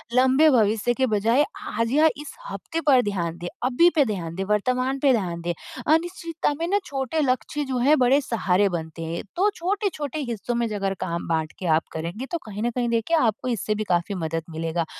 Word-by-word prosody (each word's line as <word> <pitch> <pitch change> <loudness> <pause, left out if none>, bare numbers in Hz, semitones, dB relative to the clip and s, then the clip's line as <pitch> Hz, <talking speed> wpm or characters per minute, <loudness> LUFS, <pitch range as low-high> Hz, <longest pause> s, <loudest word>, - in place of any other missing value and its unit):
लंबे 260 +5 +5
भविष्य 225 -1 +3
के 260 +1 +1
बजाय 225 +7 +3 0.4
आज 230 0 +1
या 305 +4 +5
इस 295 - -8 0.2
हफ्ते 330 0 -4
पर 260 -3 +6
ध्यान 175 -5 -2
दें, 175 +1 -6 0.2
अभी 265 +8 +5
पे 295 - +5
ध्यान 170 -6 -4
दें, 195 - -2
वर्तमान 255 +5 +1
पे 275 -1 +4
ध्यान 180 -7 -1
दें, 175 +1 -2 0.4
अनिश्चितता 335 -2 -1
में 335 - -1
ना 405 +2 +2
छोटे 270 +2 -2
लक्ष्य 275 +2 0
जो 255 - 0
हैं 285 +5 +4
बड़े 255 +3 +5
सहारे 205 -6 +1
बनते 165 -1 -5
हैं। 165 +1 -4
तो 405 +3 +4
छोटे-छोटे 345 - -2
हिस्सों 235 +1 -3
में 235 -1 +1
अगर 195 -2 -1
काम 170 -1 -3
बाँट 160 -1 -1
के 185 - -5
आप 165 - -2
करेंगे, 170 +10 -4
तो 340 - 0
कहीं 210 0 -5
न 240 - +1
कहीं 240 0 -1
देखिए, 235 +8 +1
आपको 230 -2 +1
इससे 215 -2 -1
भी 215 - -2
काफ़ी 175 +4 0
मदद 165 -2 -2
मिलेगा 165 +1 -2
235 Hz, 205 wpm, -24 LUFS, 185-280 Hz, 0.4 s, पर